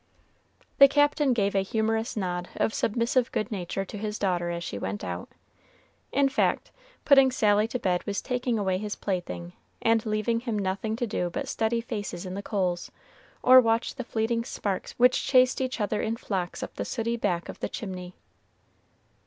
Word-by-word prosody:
The 275 - +11
Captain 290 0 +3
gave 200 -4 +1
a 195 - +3
humorous 220 +3 -1
nod 180 -2 -2
of 220 - 0
submissive 235 +3 +1
good 215 - -2
nature 195 -1 -3
to 205 - -8
his 210 0 -3
daughter 175 -3 0
as 170 0 -3
she 100 - -5
went 100 +1 -4
out. 90 0 -5 0.8
In 280 0 +3
fact, 270 - 0 0.3
putting 270 -2 +7
Sally 210 -4 +3
to 235 - -3
bed 180 -6 0
was 200 0 -1
taking 250 -2 -1
away 190 -3 0
his 210 0 -4
plaything, 90 - -4 0.3
and 225 -1 +2
leaving 215 +1 0
him 230 -3 -3
nothing 200 +2 -1
to 240 - -1
do 180 -5 -2
but 280 +9 -4
study 230 -3 0
faces 205 -6 -5
in 185 - -5
the 200 - -4
coals, 185 -4 -1 0.5
or 255 +1 +9
watch 230 0 +1
the 255 - -5
fleeting 230 0 -1
sparks 200 -5 -3
which 250 +1 +4
chased 255 0 +4
each 260 -1 -2
other 210 0 0
in 225 +1 -1
flocks 185 -6 -3
up - - -8
the - - -1
sooty 230 -1 -2
back 180 -7 -1
of - - -8
the - - -3
chimney. 185 -5 -6
215 Hz, 180 wpm, -27 LUFS, 190-235 Hz, 0.8 s, The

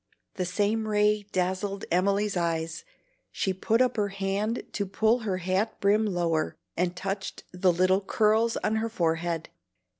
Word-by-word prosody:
The 185 - -2
same 210 +4 0
ray 210 -1 +2
dazzled 190 +2 -1
Emily's 200 +3 +2
eyes; 165 -2 -1 0.5
she 190 - -1
put 225 +6 +2
up 250 - -1
her 205 -1 +2
hand 200 +3 -2
to 200 -1 -2
pull 220 +5 +2
her 205 -5 -2
hat 185 +4 -1
brim 210 +2 +3
lower, 170 -4 0 0.2
and 180 +1 0
touched 195 +1 -4
the 180 0 +3
little 185 +3 +3
curls 220 +3 +2
on 220 - +1
her 225 +1 -1
forehead. 165 -4 -1
195 Hz, 150 wpm, -27 LUFS, 180-210 Hz, 0.5 s, brim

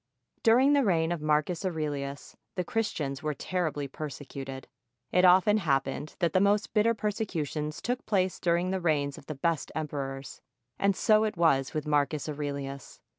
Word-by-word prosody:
During 255 +5 +5
the 285 -1 +4
reign 165 -6 +2
of 170 -3 -2
Marcus 155 +4 +1
Aurelius 145 -5 -3 0.2
the 180 - -1
Christians 150 -10 -2
were 150 -1 -2
terribly 160 -6 -2
persecuted. 135 -2 -7 0.4
It 180 0 +4
often 190 +4 +6
happened 140 -4 -1
that 170 -2 0
the 185 - +4
most 205 +1 +2
bitter 225 +2 +3
persecutions 165 -8 -3
took 245 +1 -2
place 190 -3 +1
during 175 +1 +1
the 190 -1 -1
reigns 145 -4 0
of 140 - -18
the 155 - -4
best 160 +1 -1
emperors; 140 -3 -5 0.4
and 200 -1 +3
so 215 +1 +4
it 215 -2 -2
was 140 -6 +2
with 155 - -1
Marcus 150 0 +1
Aurelius. 140 -2 -5
160 Hz, 160 wpm, -29 LUFS, 145-190 Hz, 0.4 s, often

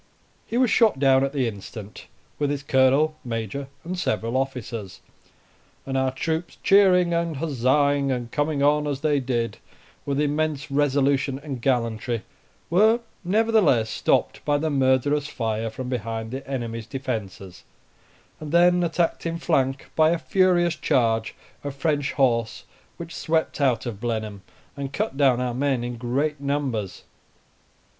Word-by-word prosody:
He 235 - -2
was 250 -4 +3
shot 225 - +4
down 135 -1 +4
at 135 - 0
the 135 -4 0
instant, 105 0 -8 0.3
with 145 -1 +1
his 145 -1 -3
colonel, 140 +3 +3
major, 115 +3 -4 0.2
and 180 +2 -4
several 115 - -1
officers; 120 -7 -3 0.9
and 135 - -4
our 130 0 +2
troops 160 +6 -3
cheering 185 -3 +5
and 170 -3 -1
huzzaing, 140 -1 +1
and 120 -2 -3
coming 145 -1 0
on, 150 +1 +3
as 140 -2 -3
they 150 -2 +2
did, 120 -3 -2 0.4
with 140 0 -2
immense 150 -1 -1
resolution 140 -1 +1
and 140 -3 -7
gallantry, 115 -2 -1 0.5
were 220 +6 +4 0.2
nevertheless 185 - +3
stopped - - 0
by 145 -1 +2
the 155 +1 -1
murderous 140 +2 +2
fire 115 -3 -2
from 125 +4 -6
behind 115 -2 -4
the 135 +1 -7
enemy's 115 -4 -4
defences, 110 -9 -5 0.8
and 155 -1 -7
then 175 +1 +5
attacked 170 0 0
in 165 0 -2
flank 135 -5 0
by 155 0 +5
a 170 - +2
furious 175 -1 +2
charge 115 -7 +1 0.3
of 145 -1 -5
French 145 -2 0
horse 115 -5 +1 0.3
which 170 -1 -8
swept 160 -2 -1
out 130 -3 +2
of 110 -4 -6
Blenheim, 110 -4 -3 0.3
and 140 -1 -5
cut 135 - -2
down 135 -3 +3
our 125 -1 -1
men 130 -1 0
in 120 0 -4
great 135 +5 -1
numbers. 135 -9 -2
135 Hz, 145 wpm, -24 LUFS, 120-155 Hz, 0.9 s, cheering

